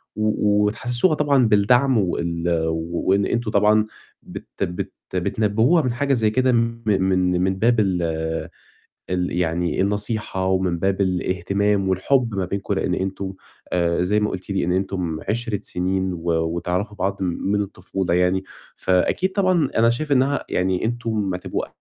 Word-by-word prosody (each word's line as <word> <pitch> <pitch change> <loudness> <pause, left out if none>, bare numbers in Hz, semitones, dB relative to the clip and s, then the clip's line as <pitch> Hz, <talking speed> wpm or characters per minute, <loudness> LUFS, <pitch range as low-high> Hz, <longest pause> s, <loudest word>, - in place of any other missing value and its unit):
و 105 -1 +2
وتحسِّسوها 120 - +2
طبعًا 140 -5 +3
بالدعم 120 +5 +4
وال 85 -3 -1 0.2
و 80 +1 -3
وإن 100 0 +3
أنتم 120 -2 -1
طبعًا 105 +1 +4 0.4
بت - - -9 0.2
بت 90 0 -4 0.2
بتنبّهوها 110 - +2
من 125 -3 -1
حاجة 140 +2 0
زي 110 -4 +2
كده 130 +3 +2
م 115 0 0
من 95 -3 +2
من 95 0 +1
باب 115 0 +3
ال 95 -4 +1 1.1
ال 90 -1 -1
يعني 85 +1 0
النصيحة 105 -1 -1
ومن 95 -2 +1
باب 95 +2 0
الاهتمام 95 +2 0
والحُب 115 +5 +1
ما 95 -2 -1
بينكم، 100 +2 -3
لإن 90 -2 0
أنتم 95 0 -3 0.4
آآ 85 0 +1
زي 105 +4 +1
ما 105 - 0
قُلتِ 95 +2 -7
لي 95 - 0
إن 90 - 0
أنتم 90 -4 -2
عِشرِة 110 -2 -1
سِنين 95 +1 -1
و 85 0 -2 0.2
وتعرفوا 90 +5 -2
بعض 100 +1 -1
من 95 +3 -1
الطفولة 95 -2 -3
يعني. 90 +2 +2 0.3
فأكيد 95 - +1
طبعًا 185 -7 +2
أنا 115 +1 +5
شايف 145 +5 -2
إنّها 135 +2 +2
يعني 90 +1 0
أنتم 110 -5 -1
هتبقوا 90 - -3
100 Hz, 150 wpm, -22 LUFS, 90-115 Hz, 1.1 s, أنا